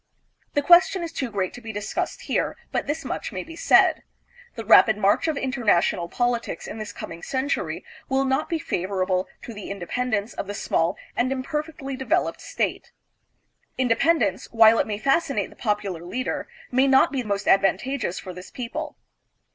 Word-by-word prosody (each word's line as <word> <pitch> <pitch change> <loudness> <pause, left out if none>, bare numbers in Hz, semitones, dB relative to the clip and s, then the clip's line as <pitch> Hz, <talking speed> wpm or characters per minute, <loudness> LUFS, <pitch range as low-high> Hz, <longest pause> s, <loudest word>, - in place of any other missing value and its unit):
The 290 - +2
question 350 +2 +6
is 335 - -4
too 260 -6 -2
great 195 -4 -2
to 245 - -10
be 225 -1 -6
discussed 205 -1 -3
here, - - -1
but - - -1
this 310 +3 -3
much - - -4
may - - -4
be 330 0 -11
said: - - +4 0.5
The 225 -2 -6
rapid 220 0 +7
march 205 +8 +2
of 310 -3 0
international 220 -10 +1
politics 240 -1 -1
in 220 - -7
this 215 -1 -5
coming 170 -4 -8
century 270 - -2 0.2
will 270 0 +2
not 265 +3 0
be 330 - 0
favorable 185 - -1 0.2
to 235 - -7
the 205 -1 -8
independence 205 +3 -2
of 195 - -5
the 205 - -5
small 165 -4 0 0.2
and 250 +2 +1
imper 270 +3 -1
fectly 290 -4 -7
developed 265 +7 0
state. - - -3 0.9
Independence, 260 +6 +2
while 225 0 +6
it - - +1
may 210 -1 -2
fas 275 +9 +2
cinate 210 -9 -2
the - - -15
popular 205 -6 -2
leader, 250 +9 -3 0.2
may 260 +2 +4
not 265 -1 +5
be 270 -3 -1
most 200 -3 -3
advantageous 195 +2 +2
for 185 - -7
this 180 +1 -10
people. 290 +5 -5
240 Hz, 175 wpm, -24 LUFS, 200-275 Hz, 0.9 s, rapid